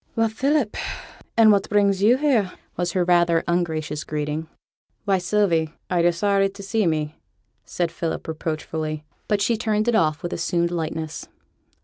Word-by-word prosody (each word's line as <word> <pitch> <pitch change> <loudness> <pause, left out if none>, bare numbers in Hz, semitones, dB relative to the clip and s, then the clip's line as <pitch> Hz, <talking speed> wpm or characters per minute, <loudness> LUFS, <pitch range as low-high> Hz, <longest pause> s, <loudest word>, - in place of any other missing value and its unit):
'Well, 225 0 +2
Philip! 270 0 0 0.6
an' 220 -1 +7
what 200 -1 +2
brings 200 -2 +2
yo' 230 +5 +5
here?' 255 -10 +2 0.2
was 175 -1 -1
her 185 - +2
rather 175 -1 +3
ungracious 160 -3 -1
greeting. 150 +1 -3 0.6
'Why, 195 -2 +2
Sylvie, 175 -4 +1 0.2
are 180 - +2
yo' 175 - +5
sorry 195 +3 +2
to 200 +1 -11
see 205 0 +1
me?' 155 -1 -2 0.5
asked 175 -2 -1
Philip, 165 -1 -4
reproachfully. 155 -1 -3 0.2
But 205 -2 +1
she 230 +1 +2
turned 215 -1 0
it 240 - +3
off 155 -7 +2
with 175 - -3
assumed 170 0 0
lightness. 160 -2 -4
175 Hz, 155 wpm, -23 LUFS, 160-210 Hz, 0.6 s, an